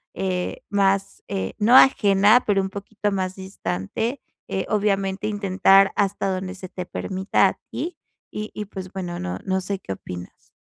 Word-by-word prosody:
eh, 185 -2 -2
más, 195 -1 +1
eh, 95 -1 -2
no 230 +4 +5
ajena, 210 -2 +6
pero 200 -2 +3
un 190 - -3
poquito 205 +1 -3
más 190 -1 -2
distante. 190 - -3 0.3
Eh, 190 - -1
obviamente 200 -1 0
intentar 195 -1 +4
hasta 200 -1 +1
donde 185 0 -3
se 185 -1 -8
te 180 0 -6
permita 190 +2 +1
a - - -8
ti, 350 - -4 0.4
y 215 0 -5
y 210 - -5
pues 190 -2 -8
bueno 175 -2 -4
no 90 +1 -4
no 190 0 0
sé, 195 +1 -3
¿qué 95 - -5
opinas? 90 -1 -10
195 Hz, 165 wpm, -23 LUFS, 185-205 Hz, 0.4 s, ajena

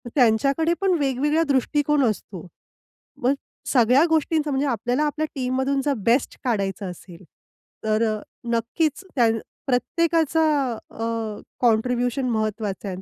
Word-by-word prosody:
त्यांच्याकडे 275 +6 +3
पण 385 -1 +3
वेगवेगळा 290 +3 +1
दृष्टिकोन 290 +2 +2
असतो. 190 -4 -6 0.8
मग 255 +3 +4 0.4
सगळ्या 250 +4 +5
गोष्टींचा 310 -1 +1
म्हणजे 275 +1 0
आपल्याला 245 +3 0
आपल्या 305 +1 -1
टीममधून 265 +1 0
जर 290 - +2 0.2
बेस्ट 250 +3 +1
काढायचं 200 -4 -1
असेल, 175 0 -13 0.6
तर 215 +1 +2
अ, - - -9 0.3
नक्कीच 295 - -1
त्यान 225 -3 +3 0.3
प्रत्येकाचा 320 +4 +1 0.5
अ, 225 -2 -4 0.2
कॉन्ट्रिब्युशन 245 +2 +1
महत्त्वाचा 215 -3 -2
आहे 190 - -3
आणि 185 - -9
250 Hz, 120 wpm, -23 LUFS, 225-295 Hz, 0.8 s, सगळ्या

